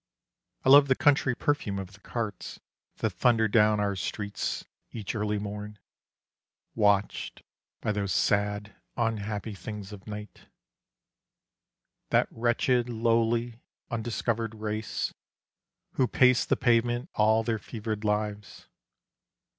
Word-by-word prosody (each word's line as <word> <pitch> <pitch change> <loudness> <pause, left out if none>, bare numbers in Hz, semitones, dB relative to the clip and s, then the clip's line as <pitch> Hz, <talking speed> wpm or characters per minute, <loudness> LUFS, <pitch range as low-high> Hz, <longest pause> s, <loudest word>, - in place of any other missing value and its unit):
I - - +4
love 140 +1 +9
the 130 - +3
country 140 -3 +3
perfume 145 -10 -1
of 95 0 -6
the 105 - -15
carts 110 -1 -5 0.4
That - - 0
thunder 115 -2 +3
down 105 0 +4
our 100 -1 0
streets 100 +4 -3 0.3
each 105 -4 -5
early 105 -1 -1
morn, 105 +1 -6 1.0
Watched 105 -2 +1 0.4
by - - 0
those 100 -2 -2
sad 105 0 +1 0.2
unhappy 110 -2 -2
things 100 +1 -7
of 100 0 -12
Night, 105 0 -8 1.6
That - - +3
wretched, 120 +1 +1
lowly, 115 +1 +1 0.3
undiscovered 115 -1 -2
race 110 0 -3 0.8
Who 130 - +1
pace 125 0 +4
the - - +1
pavement 120 +3 +1
all 110 +1 +3
their 110 0 -1
fevered 110 0 -5
lives. 105 -1 -2
110 Hz, 115 wpm, -28 LUFS, 105-120 Hz, 1.6 s, love